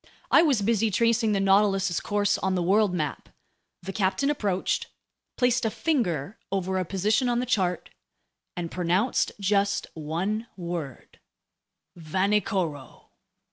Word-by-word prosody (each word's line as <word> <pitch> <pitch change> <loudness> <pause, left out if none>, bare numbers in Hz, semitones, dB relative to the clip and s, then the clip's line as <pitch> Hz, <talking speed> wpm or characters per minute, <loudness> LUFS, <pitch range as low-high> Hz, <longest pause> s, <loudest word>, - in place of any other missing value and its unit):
I - - +7
was 275 -11 +2
busy 225 +1 +2
tracing 230 +1 +2
the 200 - +1
Nautilus's 195 -2 +3
course 205 -1 0
on 190 -1 0
the 180 - 0
world 200 +3 +3
map. 155 -5 -3 0.5
The 195 +2 -5
captain 210 +9 +1
approached, 200 -9 -1 0.5
placed 245 -1 +2
a 225 - +2
finger 215 - -1
over 190 -1 -1
a 185 - -1
position 210 - +1
on 240 - +1
the 250 - 0
chart, 185 -8 -1 0.7
and 170 -2 -4
pronounced 180 +7 +1
just 200 0 +1
one 180 +9 -3
word: 170 -6 -6 0.8
"Vanikoro." 180 - -2
195 Hz, 130 wpm, -26 LUFS, 180-220 Hz, 0.8 s, I